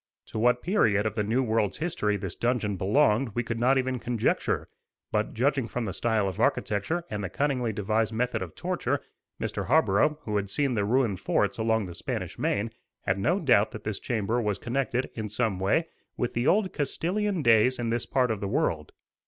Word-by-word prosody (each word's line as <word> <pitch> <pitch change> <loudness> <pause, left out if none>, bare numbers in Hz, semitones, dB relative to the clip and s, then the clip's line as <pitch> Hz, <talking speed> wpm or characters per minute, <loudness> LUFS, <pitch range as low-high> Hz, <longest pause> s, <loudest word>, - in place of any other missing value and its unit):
To 110 - -4
what 125 +2 +3
period 110 - +2
of 110 - 0
the 110 - -1
New 115 +6 +1
World's 110 -4 0
history 155 -11 0
this 95 -3 -5
dungeon 120 -4 0
belonged 110 +3 +2
we 120 - 0
could 115 -1 -3
not 130 +3 +4
even 130 -1 0
conjecture; 120 -2 0 0.4
but, - - -1
judging 130 +1 +1
from 120 -1 -3
the 95 - -3
style 110 -4 +1
of 95 - -5
architecture 110 - 0
and 105 -1 -3
the 95 - -3
cunningly 130 - 0
devised 110 +2 0
method 120 +1 -1
of 90 -4 -6
torture, - - -1 0.4
Mr. - - -3
Harborough, 150 +1 +3
who 105 -1 -1
had 100 -1 -2
seen 140 +4 0
the 105 -3 0
ruined 115 -4 +1
forts - - 0
along 110 -1 +1
the 90 - -7
Spanish - - -5
Main, 110 +3 0 0.3
had 95 +1 0
no 175 - +2
doubt 120 - +4
that 110 - -7
this 105 -2 -3
chamber 115 0 -1
was 105 -3 -1
connected, 125 0 -1
in 110 -2 -4
some 105 -3 -1
way, 100 - +2 0.3
with 125 - -1
the 120 +2 0
old 200 -1 +3
Castilian 180 +5 -1
days 115 +2 +5
in 115 -1 -2
this 120 0 -1
part 125 -3 +2
of 110 - -2
the 100 - -3
world. 80 -5 -1
115 Hz, 200 wpm, -27 LUFS, 105-130 Hz, 0.4 s, days